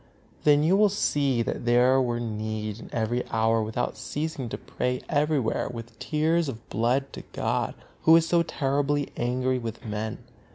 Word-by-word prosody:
Then 145 0 +5
you 170 +5 +4
will 210 +1 +5
see 140 - +1
that - - -3
there 125 +2 +4
were 120 -2 0
need 110 -1 -4
every 120 +1 0
hour 110 0 +2
without 110 +3 -2
ceasing 150 -5 -4
to 130 - -4
pray 125 0 -3
everywhere 145 -5 +1
with 115 -1 -9
tears 160 +1 +1
of 115 -3 -8
blood 125 +5 0
to - - -7
God, - - -1 0.3
Who 160 - +8
is 165 0 +4
so 170 0 +3
terribly 145 -1 0
angry 125 +1 0
with 115 -1 -6
men. 110 0 -3
125 Hz, 160 wpm, -26 LUFS, 115-145 Hz, 0.3 s, Who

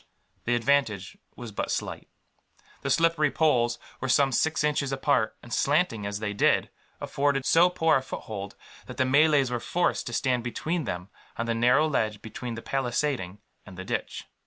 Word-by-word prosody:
The 120 - +2
advantage 120 -5 +1 0.2
was 120 -2 -8
but 100 - -3
slight. - - -3 0.7
The - - -3
slippery 165 -2 +3
poles 120 -7 +2 0.2
were 130 - -3
some 135 +1 +4
six 160 +5 +1
inches 145 -2 0
apart 135 -4 +1
and, 120 - -8
slanting 140 - +1
as 100 0 -3
they 105 -1 -3
did, 105 - +2 0.3
afforded 140 -1 0
so 175 +2 +5
poor 160 -4 +3
a - - -2
foothold 100 -6 -7 0.3
that - - -9
the 130 - +2
Malays 140 -1 +4
were 120 - -1
forced 175 +8 0
to 120 - -5
stand 125 -1 0
between 155 +7 -2
them, 90 -1 -5 0.3
on 115 - -1
the 115 - 0
narrow 125 +7 +3
ledge 110 -8 -1
between 115 +2 -6
the 115 - -8
palisading 125 -7 -2 0.2
and 95 -3 -13
the 95 - -7
ditch. - - -4
125 Hz, 175 wpm, -27 LUFS, 115-145 Hz, 0.7 s, so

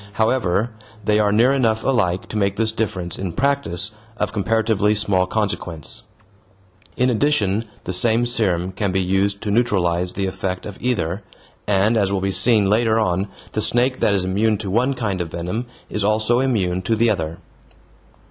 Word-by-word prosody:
However, 110 -1 +1 0.3
they 105 0 +3
are 105 -1 +3
near 115 +5 +4
enough 115 -5 +1
alike 100 -9 0
to - - -7
make 100 -2 +1
this 110 0 +1
difference, 95 -6 -3
in 95 -3 -3
practice, 130 -7 0 0.3
of - - -2
comparatively 110 0 +1
small 95 -3 +1
consequence. 95 -7 -3 0.9
In 125 +1 +3
practice 145 -8 +2 0.4
the 90 - -4
same 115 +5 +3
serum 95 -7 0
can 95 +1 -2
be 95 - +1
used 95 +2 0
to 105 - -2
neutralize 90 -6 +1
the 100 - -2
effect 95 0 -3
of 105 -2 -8
either, 100 -6 -1 0.5
and, 105 +3 +3
as 100 -2 +1
will 100 - 0
be 95 +1 -1
seen 110 -1 +4
later 110 +2 +2
on, 95 -1 0 0.2
the 110 - -1
snake 125 +4 +1
that 100 - +2
is 95 -2 0
immune 105 +3 +1
to 100 -3 -5
one 125 +6 +1
kind 105 -7 -2
of 85 - -4
venom 90 +9 -4 0.2
is 105 - -2
also 110 +3 +2
immune 100 -9 0
to 110 +4 0
the 115 +1 +3
other. 80 -4 -3
105 Hz, 175 wpm, -21 LUFS, 95-115 Hz, 0.9 s, near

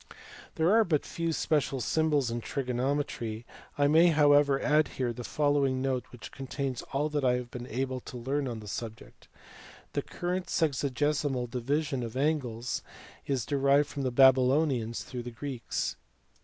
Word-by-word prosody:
There 160 +3 +3
are 225 +1 +6
but 160 -7 0
few 165 0 -2
special 150 -4 0
symbols 145 -2 +1
in 120 0 -3
trigonometry, 125 -3 -2 0.3
I 145 - +3
may 160 +4 +6
however 145 -3 +5
add 150 +2 +3
here 125 -2 0
the 120 - -7
following 145 -1 +1
note 130 -1 -1
which 125 - -10
contains 135 -1 -4
all 145 +2 0
that 150 -2 -1
I 125 -1 +4
have 125 -1 -3
been 125 0 -7
able 130 +2 -2
to 125 - -9
learn 135 +3 -1
on 115 -3 -5
the 105 - -10
subject. 110 +1 -7 0.7
The - - 0
current 180 +1 -3
sexagesimal 140 -3 0
division 135 +2 -1
of 115 +1 -5
angles 130 -5 -1 0.5
is 130 -5 0
derived 140 +1 +3
from 140 - -5
the 130 - 0
Babylonians 130 -1 +3
through 125 -2 -6
the 120 - -6
Greeks. 125 0 -4
135 Hz, 155 wpm, -29 LUFS, 125-145 Hz, 0.7 s, are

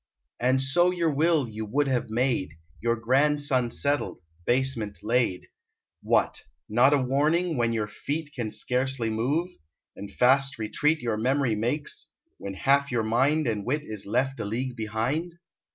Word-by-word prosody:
And 130 +2 +2
so 175 +7 +3
your 170 -3 0
will 155 -1 +2
you 110 0 -6
would 140 +7 0
have 125 -4 -1
made, 115 - 0 0.3
Your 115 0 +1
grandson 130 +1 +2
settled; 140 -7 -1 0.2
basement 120 -5 0
laid. 115 -5 0 0.6
What! - - +1 0.3
not 120 +6 +4
a - - +3
warning, 150 +6 +1
when 120 -2 +1
your 110 -2 -1
feet 145 +8 -5
Can 115 -4 -3
scarcely 125 0 -1
move, 140 +11 0 0.5
and 100 - -8
fast 135 +2 +3
retreat 150 +8 0
Your 115 -3 -1
memory 130 +1 +1
makes, 120 +8 -2 0.3
when 100 -1 -6
half 140 +6 +2
your 120 -2 0
mind 135 +8 +2
And 110 -4 -1
wit 145 +7 -1
is 105 -8 -7
left 130 +5 0
a - - -2
league 120 +4 -3
behind? 120 +10 -2
130 Hz, 150 wpm, -26 LUFS, 115-145 Hz, 0.6 s, not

